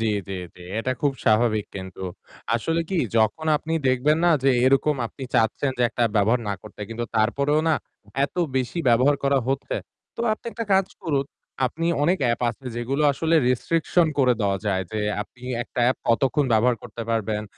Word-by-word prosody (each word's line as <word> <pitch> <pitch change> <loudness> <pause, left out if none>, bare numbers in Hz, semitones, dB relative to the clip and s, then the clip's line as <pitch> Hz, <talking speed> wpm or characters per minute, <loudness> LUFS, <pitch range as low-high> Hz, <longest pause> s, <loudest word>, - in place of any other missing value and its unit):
জি, - - 0 0.2
জি, - - -4 0.2
জি। - - -17 0.2
এটা 130 - -1
খুব 145 -2 +2
স্বাভাবিক 110 -1 +3
কিন্তু। 95 -1 -8 0.5
আসলে 165 +8 0
কি 190 - 0 0.2
যখন 115 +8 +2
আপনি 160 +2 -5 0.2
দেখবেন 135 +5 +2
না 175 - +5
যে, 135 - +4
এরকম 135 +3 +3
আপনি 135 - -12
চাচ্ছেন, 115 +5 +2
যে - - +2
একটা 120 - -2
ব্যবহার 110 +4 +3
না 100 - 0
করতে 105 -1 -13
কিন্তু 115 +1 -4
তারপরেও 140 +7 +2
না 160 - +4 0.5
এত - - -6 0.2
বেশি 130 +6 -1
ব্যবহার 130 +5 +4
করা 140 0 +3
হচ্ছে। 135 0 -1 0.4
তো - - -5
আপনি 215 - -7
একটা 230 - -4
কাজ 190 0 +4 0.2
করুন, 145 -5 0 0.4
আপনি 165 +6 -3 0.2
অনেক 175 +5 +3
app - - -4
আছে 120 +4 -15
যেগুলো 130 +5 -1
আসলে 160 +4 0
restriction 165 +6 +2
করে 130 -2 +5
দেওয়া 100 -2 +1
যায়। 95 -2 +1
যে 110 - -1 0.2
আপনি 120 +4 -21 0.2
একটা 120 - -5
app - - -3
কতক্ষণ 135 +5 +2
ব্যবহার 120 +2 +3
করতে 115 - -7
পারবেন 110 -2 -1
130 Hz, 180 wpm, -24 LUFS, 110-150 Hz, 0.5 s, না